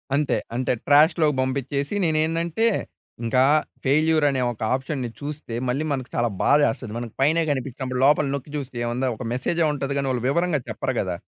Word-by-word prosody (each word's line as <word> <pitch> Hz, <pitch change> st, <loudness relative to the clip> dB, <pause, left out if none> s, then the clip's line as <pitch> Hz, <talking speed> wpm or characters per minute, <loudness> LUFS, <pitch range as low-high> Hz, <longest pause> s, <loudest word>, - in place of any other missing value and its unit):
అంతే 145 Hz, 0 st, +1 dB, 0.2 s
అంతే 125 Hz, +1 st, 0 dB
ట్రాష్‌లోకి 150 Hz, +1 st, +5 dB
పంపించేసి 140 Hz, +4 st, -2 dB
నేనేందంటే 165 Hz, +6 st, +1 dB, 0.6 s
ఇంకా 125 Hz, +3 st, +3 dB, 0.4 s
ఫెయిల్యూర్ 155 Hz, +2 st, +3 dB
అనే 135 Hz, -2 st, 0 dB
ఒక 115 Hz, -, -11 dB
ఆప్షన్‌ని 130 Hz, -1 st, -2 dB
చూస్తే 145 Hz, -5 st, -6 dB
మళ్ళీ 135 Hz, +5 st, 0 dB
మనకు 130 Hz, -2 st, -4 dB
చాలా 120 Hz, 0 st, +1 dB
బాధ 145 Hz, -, +5 dB
వేస్తుంది. 115 Hz, -1 st, -4 dB
మన 120 Hz, 0 st, -4 dB
పైనే 155 Hz, +5 st, +3 dB
కనిపించినప్పుడు 130 Hz, -1 st, -3 dB
లోపల 150 Hz, +1 st, +4 dB
నొక్కి 140 Hz, +1 st, -7 dB
చూస్తే 135 Hz, -3 st, -6 dB
ఏముంది. 120 Hz, +3 st, -1 dB
ఒక 125 Hz, -, -6 dB
మెసేజ్ 145 Hz, +7 st, -1 dB
ఉంటది 140 Hz, -1 st, -3 dB
కానీ 140 Hz, -1 st, -1 dB
వాళ్ళు 125 Hz, -2 st, -2 dB
వివరంగా 170 Hz, +1 st, +1 dB
చెప్పరు -, -, -2 dB
కదా! -, -, -3 dB
140 Hz, 165 wpm, -23 LUFS, 130-155 Hz, 0.6 s, ట్రాష్‌లోకి